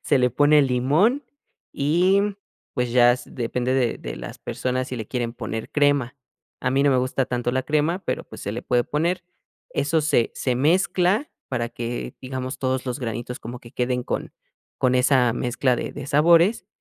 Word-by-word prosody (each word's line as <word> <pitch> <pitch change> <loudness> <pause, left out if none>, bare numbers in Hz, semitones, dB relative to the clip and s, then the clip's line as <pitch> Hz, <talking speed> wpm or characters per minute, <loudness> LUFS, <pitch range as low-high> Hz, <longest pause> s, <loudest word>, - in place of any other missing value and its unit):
se - - +2
le 125 0 +3
pone 145 +4 +5
limón, 145 - +2 0.5
y 175 +7 +3 0.5
pues 125 -3 -1
ya 120 -1 +6
s 125 0 -6
depende 125 +1 -2
de 125 -3 +1
de - - -6
las - - -8
personas 130 0 -2
si 125 - -4
le 110 -2 -5
quieren 120 -2 -2
poner 110 -2 -5
crema, 145 -3 +2 0.4
a 125 - 0
mí 135 +1 +2
no 145 - +4
me 130 - +3
gusta 130 +1 0
tanto 120 -1 -1
la 130 +1 0
crema, 155 +5 +1
pero - - -2
pues - - -11
se 100 - -3
le 120 +3 -5
puede 120 -1 +1
poner, 170 +5 -1 0.5
eso 155 +3 +1
se 145 -6 +2
se 125 -2 -1
mezcla 180 - +2 0.2
para 120 -3 -2
que, 120 0 -5
digamos, 130 0 -5
todos 130 0 -1
los 125 +2 -2
granitos 120 +1 -4
como 120 +2 -7
que 120 +2 -14
queden 125 0 -1
con - - -4 0.5
con 130 0 +2
esa 125 -2 +4
mezcla 125 +1 0
de - - -4
de 145 -2 -7
sabores, 170 +8 +4
130 Hz, 185 wpm, -23 LUFS, 120-145 Hz, 0.5 s, ya